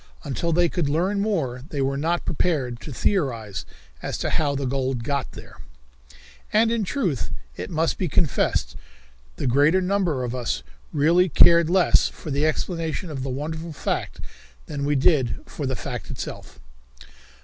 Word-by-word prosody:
Until 170 +5 -2
they 175 +1 +4
could 165 -3 -1
learn 180 +7 +1
more 155 - -1
they 145 - -4
were 135 0 +1
not 165 +5 0
prepared 140 -8 0
to 150 - -8
theorize 120 - -1 0.3
as - - -3
to - - -2
how 145 -2 +1
the 140 0 -2
gold 130 -2 -1
got 140 0 -2
there. - - -12 0.9
And 225 +2 +4
in 230 -2 +1
truth, 185 - -1 0.3
it 90 - -5
must 160 +1 0
be 185 - 0
confessed, 155 0 +1 0.6
the - - -4
greater 145 +8 +4
number 180 -8 0
of 120 -1 -3
us 125 -2 -2 0.3
really 170 +4 +4
cared 170 0 +6
less 185 0 +4
for 155 - -8
the 145 +3 +2
explanation 165 +1 -2
of 135 -3 -4
the 135 - -3
wonderful 160 +5 -4
fact - - -3 0.5
than 140 -1 -3
we 145 +1 +2
did 135 -2 +3
for 145 - -5
the 130 - -1
fact - - -6
itself. - - -7
150 Hz, 160 wpm, -24 LUFS, 135-175 Hz, 0.9 s, cared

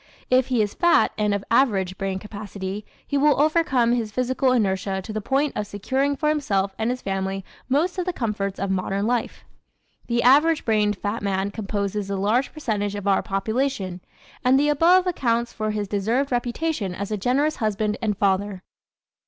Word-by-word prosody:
If 255 0 +4
he 245 -4 +2
is 205 - -3
fat 345 -1 +3
and 210 -1 0
of 200 -1 -1
average 200 -7 +2
brain 195 0 -2
capacity 200 0 -6 0.2
he 285 - 0
will 290 -1 +4
overcome 290 -6 +3
his 230 -3 0
physical 255 +3 +1
inertia 195 -4 0
to 205 +3 -7
the 215 - -2
point 275 +6 0
of 210 - -2
securing 265 +8 -1
for 300 +2 0
himself 200 -11 0
and 220 +1 0
his 250 +1 -3
family 195 0 -2 0.2
most 335 +8 +1
of 360 - -2
the - - +1
comforts 205 - -3
of 195 0 -1
modern 195 +2 -1
life. 240 0 -2 0.6
The 235 0 +1
average 300 +5 +5
brained 210 -2 +2
fat 205 +4 -3
man 195 0 -1
composes 200 -1 -3
a 200 - -1
large 215 +7 +1
percentage 210 -9 -2
of 205 -1 -5
our 195 - +3
population 195 -2 -2 0.4
and 260 +1 +4
the 295 +1 +2
above 345 +5 +4
accounts 240 -9 0
for 215 -1 -2
his 210 -1 -2
deserved 225 +8 0
reputation 245 - -1
as 200 +2 -5
a - - +1
generous 275 +9 +1
husband 215 -1 0
and 210 -4 -1
father. 195 -1 0
215 Hz, 180 wpm, -23 LUFS, 200-265 Hz, 0.6 s, average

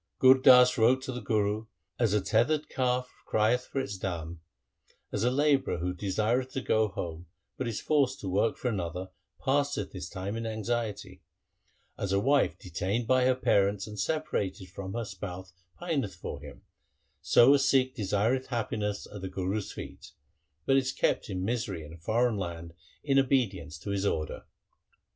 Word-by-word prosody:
Gur 130 0 +7
Das 125 -2 +7
wrote 125 +4 +4
to 130 - -4
the 125 -1 -5
Guru, 105 0 0
' - - -49
As 105 -3 +3
a 105 - +2
tethered 120 +10 +1
calf 125 -1 0 0.2
crieth 115 +4 +2
for 135 - -3
its 115 -8 -4
dam; 85 -3 -4 0.7
as 105 - -1
a 120 - +4
labourer 140 -2 +2
who 90 +2 -2
desireth 110 +7 0
to 135 - -2
go 110 -2 +2
home, 85 -3 -6 0.3
but 130 - -3
is 115 -3 -3
forced 140 -3 +1
to 100 - -5
work 100 +4 +1
for - - -3
another, 95 -3 -3 0.3
passeth 140 +1 0
his - - -6
time 95 +3 -4
in 115 0 -3
anxiety; 110 -1 -3 0.8
as 100 - -2
a 100 - +3
wife 140 +6 +2
detained 95 +6 -2
by 130 +1 +3
her 130 0 +4
parents 100 -5 +2
and 105 -1 -8
separated 100 - -2
from 95 0 -6
her 120 -1 -2
spouse 95 -2 -7 0.3
pineth 140 - -2
for 90 - -7
him, - - -11 0.6
so 125 +4 +6
a 145 - +4
Sikh 135 -1 +3
desireth 110 +4 0
happiness 110 -4 -2
at 105 - -7
the 95 - -4
Guru's 95 +2 -3
feet, - - -9 0.5
but 135 - +4
is 135 -1 +1
kept - - 0
in 95 -1 -3
misery 110 -7 -2
in 75 - -11
a - - -11
foreign 115 +6 +1
land 85 -3 -5 0.3
in 135 -2 +3
obedience 105 - 0
to 100 +6 -6
his 100 0 0
order.' 75 -5 -3
110 Hz, 175 wpm, -29 LUFS, 95-130 Hz, 0.8 s, Gur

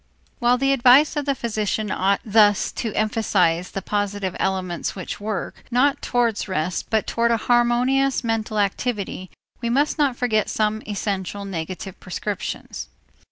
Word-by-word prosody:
While 245 +1 +3
the 275 +2 +2
advice 270 +4 +5
of 295 -1 -1
the 280 - +2
physician 215 -3 -2
ought 195 +1 +1
thus 210 -2 +4
to 225 - -3
emphasize 190 -6 +1
the 195 - -5
positive 205 -2 -2
elements 185 -3 -2
which 185 -3 -6
work, 210 0 -4
not 260 +3 +2
towards 235 -4 0
rest, 180 -2 -2
but 220 -1 +1
toward 235 0 +1
a 230 - +3
harmonious 245 +4 +2
mental 225 -2 -1
activity, 200 -2 -2 0.3
we 235 - -1
must 285 +6 +1
not 275 -4 +2
forget 220 -4 +1
some 215 0 0
essential 200 -1 -3
negative 185 +1 -6
prescriptions. 185 - -5
215 Hz, 145 wpm, -22 LUFS, 195-240 Hz, 0.3 s, advice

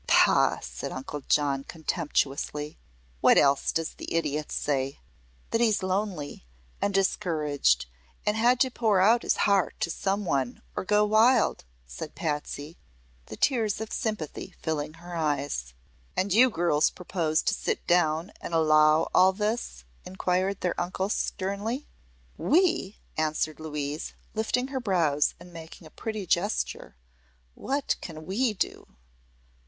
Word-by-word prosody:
"Pah!" - - +5
said - - -6
Uncle 140 +2 -6
John, 140 -2 +2
contemptuously. 150 -2 -2 0.4
"What - - +5
else 140 0 +4
does 165 -1 -2
the - - -8
idiot 150 -2 -1
say?" 135 -1 -1 0.5
"That 230 - +1
he's 215 -4 +2
lonely 185 - -2 0.4
and 200 - +1
discouraged, 155 - +1 0.4
and 210 - +2
had 240 +3 +3
to 260 - +3
pour 220 -5 +2
out 225 +5 +5
his - - +1
heart 200 -2 +2
to 170 - 0
some 200 +3 -1
one 135 -6 -1
or - - -3
go 210 +2 +4
wild," 220 - +3 0.2
said 105 - -8
Patsy, 150 -1 -4 0.5
the 110 - -8
tears 225 -7 +1
of 220 -1 -5
sympathy 215 - -4
filling 155 -1 -2
her 175 +1 -9
eyes. 145 - -2 0.4
"And 190 0 +1
you 250 +5 +6
girls 170 -7 +2
propose 170 -4 -1
to - - +1
sit - - -2
down 175 +1 +2
and 170 - -4
allow 155 -1 +5
all 190 +1 +6
this?" 210 - -2 0.2
inquired 185 +1 -1
their 180 -1 -1
uncle 185 +2 -2
sternly. 205 +7 -2 0.5
"We?" 330 - +2 0.2
answered 155 0 -1
Louise, 150 -1 -4 0.2
lifting 235 +4 0
her 270 -1 -2
brows 170 - +1
and 175 0 -14
making 165 +1 -11
a 155 - -13
pretty 215 -3 -5
gesture. 180 - -1 0.6
"What 275 - -1
can 155 -3 -8
we 215 +5 0
do?" 180 - -4
175 Hz, 140 wpm, -27 LUFS, 150-210 Hz, 0.6 s, you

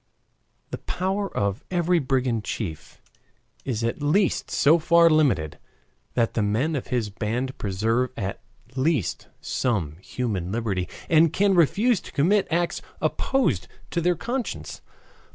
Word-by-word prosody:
The - - -4
power 190 +2 -2
of 100 0 -1
every 175 -1 +2
brigand 130 -5 0
chief 85 -10 -6 0.6
is 120 -4 -2
at 115 +5 -2
least 165 +6 +1
so 155 +4 +4
far 170 +1 +5
limited 135 - +2 0.6
that 115 -2 +1
the 115 - 0
men 115 +10 +1
of 135 - -4
his 115 -5 -1
band 120 +6 -2
preserve 110 +6 0
at 100 -2 -4 0.3
least 135 - 0
some 90 - -1
human 95 -3 -3
liberty, 105 -5 -2 0.2
and 165 -1 +5
can 200 0 +3
refuse 195 - +3
to - - -11
commit 185 +8 +2
acts 170 +1 0 0.2
opposed 245 - 0 0.2
to 170 - 0
their 175 +1 +2
conscience. 245 +7 -4
130 Hz, 135 wpm, -25 LUFS, 110-170 Hz, 0.6 s, far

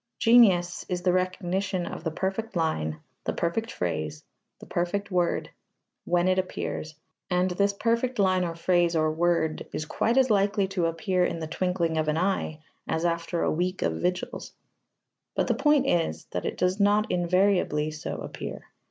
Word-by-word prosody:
Genius 195 -7 +5
is 180 -1 -2
the 180 - +3
recognition 185 0 -1
of - - -6
the 165 - 0
perfect 195 +6 -3
line, 80 - -1 0.3
the - - -1
perfect 220 +7 -1
phrase, 80 -3 -3 0.3
the - - -12
perfect 200 +4 -2
word, 175 -2 0 0.5
when 175 +1 +2
it 185 0 +3
appears, 155 -4 -4 0.3
and 180 0 +1
this 200 +3 +2
perfect 235 +4 0
line 185 -2 +3
or 170 -1 -3
phrase 175 0 +2
or 155 -1 +2
word 160 -1 0
is 155 - -3
quite 230 +9 0
as 260 -3 +4
likely 200 0 +2
to 185 -3 0
appear 180 +2 0
in 175 - 0
the 160 - -4
twinkling 170 -1 -1
of 155 - 0
an 155 +1 +1
eye 180 -3 0 0.3
as 160 +1 -1
after 170 0 -1
a - - +2
week 180 +3 -1
of 80 -1 -1
vigils. 180 0 -2 0.8
But - - +1
the 240 - +1
point 280 +2 +3
is 170 -10 0
that - - -3
it - - -4
does 180 +2 +1
not 205 +1 +3
invariably 180 -4 +2
so 155 0 -5
appear. - - -6
180 Hz, 170 wpm, -27 LUFS, 165-200 Hz, 0.8 s, Genius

